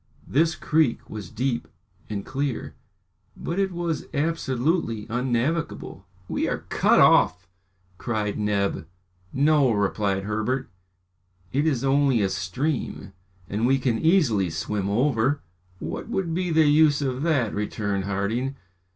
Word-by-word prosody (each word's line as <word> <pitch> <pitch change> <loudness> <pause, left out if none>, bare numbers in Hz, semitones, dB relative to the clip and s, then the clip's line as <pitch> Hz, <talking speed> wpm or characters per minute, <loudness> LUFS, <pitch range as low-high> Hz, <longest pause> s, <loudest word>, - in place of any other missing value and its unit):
This 160 +4 +2
creek 155 -8 +1
was 105 -2 -6
deep 120 +1 -2 0.4
and 100 -2 -4
clear, 140 -2 -3 0.6
but 170 +3 -3
it 195 -1 +1
was 170 -3 -3
absolutely 140 - 0
unnavigable. 125 - -2 0.2
"We - - -1
are - - -3
cut - - +4
off!" 95 +1 +5 0.5
cried 110 -4 -2
Neb. 100 -6 0 0.4
"No," 145 -1 +3
replied 100 -2 0
Herbert, 110 +6 -2 0.8
"it 145 +4 +2
is 135 -6 0
only 135 -4 +3
a 95 - +1
stream, 95 - -3 0.3
and 110 +4 0
we 135 +1 +4
can 125 -4 0
easily 140 - +3
swim 100 +5 -2
over." 130 +4 +1 0.3
"What - - -6
would 175 -4 -1
be 180 +1 -1
the 160 -1 +4
use 150 -1 +4
of 130 -1 -2
that?" 145 -9 +1
returned 100 -1 -2
Harding. 110 +7 -1
125 Hz, 125 wpm, -25 LUFS, 105-150 Hz, 0.8 s, off